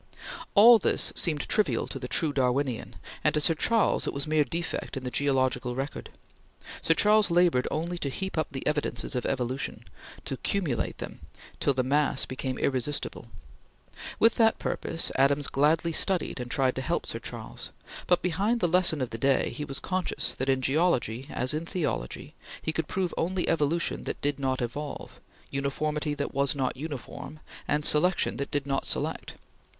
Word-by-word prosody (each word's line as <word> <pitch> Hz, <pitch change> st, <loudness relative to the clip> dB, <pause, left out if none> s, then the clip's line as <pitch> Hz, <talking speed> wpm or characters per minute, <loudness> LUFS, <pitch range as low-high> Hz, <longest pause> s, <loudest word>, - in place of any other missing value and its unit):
All 225 Hz, +3 st, +9 dB
this -, -, +2 dB
seemed 155 Hz, -4 st, +1 dB
trivial 215 Hz, -, +1 dB
to -, -, -5 dB
the -, -, -5 dB
true 155 Hz, -4 st, +1 dB
Darwinian, 130 Hz, -1 st, 0 dB, 0.3 s
and -, -, +3 dB
to -, -, +3 dB
Sir 160 Hz, +2 st, +5 dB
Charles 225 Hz, +7 st, +2 dB
it -, -, -1 dB
was 140 Hz, -, -3 dB
mere 155 Hz, -1 st, +3 dB
defect 165 Hz, -2 st, -4 dB
in 130 Hz, -, -5 dB
the 125 Hz, -, -4 dB
geological 130 Hz, -3 st, +1 dB
record. 135 Hz, +3 st, -5 dB, 0.7 s
Sir 165 Hz, -, +3 dB
Charles 210 Hz, +3 st, +4 dB
labored 170 Hz, -7 st, +3 dB
only 170 Hz, +3 st, -3 dB
to 140 Hz, -, -2 dB
heap 190 Hz, +8 st, -4 dB
up 155 Hz, -2 st, 0 dB
the 135 Hz, -1 st, -6 dB
evidences 150 Hz, -1 st, -1 dB
of 125 Hz, -, -1 dB
evolution; 130 Hz, 0 st, -2 dB, 0.4 s
to 135 Hz, -, -3 dB
cumulate 165 Hz, -10 st, -1 dB
them -, -, -7 dB, 0.4 s
till 140 Hz, -, +2 dB
the 130 Hz, -, +1 dB
mass 145 Hz, +1 st, +1 dB
became 130 Hz, 0 st, -4 dB
irresistible. 130 Hz, -2 st, -2 dB, 0.9 s
With 225 Hz, +1 st, +4 dB
that 225 Hz, -1 st, +4 dB
purpose, 165 Hz, -, -2 dB
Adams 140 Hz, +1 st, +3 dB
gladly 160 Hz, +5 st, +2 dB
studied 185 Hz, -4 st, +1 dB
and 125 Hz, 0 st, -5 dB
tried 130 Hz, 0 st, +2 dB
to -, -, -1 dB
help -, -, -1 dB
Sir -, -, -5 dB
Charles, -, -, -7 dB, 0.4 s
but, 180 Hz, -1 st, +3 dB
behind 200 Hz, +7 st, +1 dB
the 175 Hz, -, +2 dB
lesson 170 Hz, -4 st, +3 dB
of 125 Hz, -, -5 dB
the 115 Hz, -, -5 dB
day, 135 Hz, 0 st, +2 dB
he 150 Hz, -, -5 dB
was 135 Hz, -1 st, -4 dB
conscious 185 Hz, -1 st, -2 dB
that, 130 Hz, +1 st, -3 dB
in 130 Hz, -1 st, +2 dB
geology 135 Hz, -5 st, +1 dB
as 130 Hz, +3 st, 0 dB
in 160 Hz, +2 st, -3 dB
theology, 145 Hz, -, -3 dB, 0.3 s
he 160 Hz, -, -3 dB
could 160 Hz, -1 st, -2 dB
prove 185 Hz, -2 st, -1 dB
only 180 Hz, +2 st, 0 dB
Evolution 165 Hz, +1 st, 0 dB
that -, -, -4 dB
did 145 Hz, -1 st, -1 dB
not 130 Hz, -2 st, 0 dB
evolve; 145 Hz, +5 st, -6 dB, 0.3 s
Uniformity 150 Hz, +2 st, -1 dB
that 145 Hz, -, -3 dB
was 140 Hz, +1 st, +1 dB
not 130 Hz, -2 st, -1 dB
uniform; 150 Hz, +1 st, -7 dB, 0.3 s
and 150 Hz, +1 st, 0 dB
Selection 175 Hz, +5 st, +3 dB
that 140 Hz, -, -3 dB
did 145 Hz, -2 st, -2 dB
not 135 Hz, -1 st, -1 dB
select. -, -, -2 dB
145 Hz, 175 wpm, -28 LUFS, 135-170 Hz, 0.9 s, All